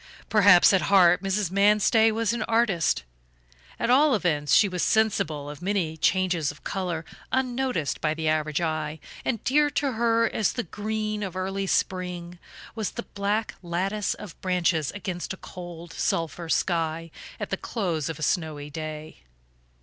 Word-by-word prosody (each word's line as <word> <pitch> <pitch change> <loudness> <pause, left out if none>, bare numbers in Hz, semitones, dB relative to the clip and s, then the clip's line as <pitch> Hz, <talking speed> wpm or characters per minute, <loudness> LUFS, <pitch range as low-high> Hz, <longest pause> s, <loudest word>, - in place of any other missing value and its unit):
Perhaps 200 -4 +7
at 190 - +4
heart 180 -2 +6
Mrs. 195 -1 -1
Manstey 210 +3 +4
was 225 0 0
an 235 - -3
artist; 220 - +2 0.7
at 240 - 0
all 280 +2 +5
events 150 -8 +1
she 205 - +6
was 180 -2 -3
sensible 165 -10 +1
of 145 +2 -8
many 180 -4 -1
changes 175 -2 +1
of 145 - -10
color 175 -5 -3 0.3
unnoticed 255 - -1
by 155 0 0
the 160 0 -2
average 155 -1 +1
eye, 155 -2 -2 0.2
and 230 -5 -2
dear 295 +3 +3
to 280 -1 0
her 230 0 +2
as 215 -1 0
the 245 - -2
green 215 +2 -3
of 190 -3 -4
early 195 +1 -2
spring 180 -2 -2 0.3
was 220 -3 -2
the 235 - -5
black 205 +2 -1
lattice 190 +4 -1
of 200 -5 -11
branches 175 -5 +1
against 190 -3 -4
a - - -9
cold 175 -2 -9
sulphur 165 0 -2
sky 165 +3 0 0.3
at - - -5
the - - +2
close 170 -9 -2
of 160 - -4
a 155 - -6
snowy 150 -2 -1
day. 155 0 -6
185 Hz, 155 wpm, -26 LUFS, 160-215 Hz, 0.7 s, Perhaps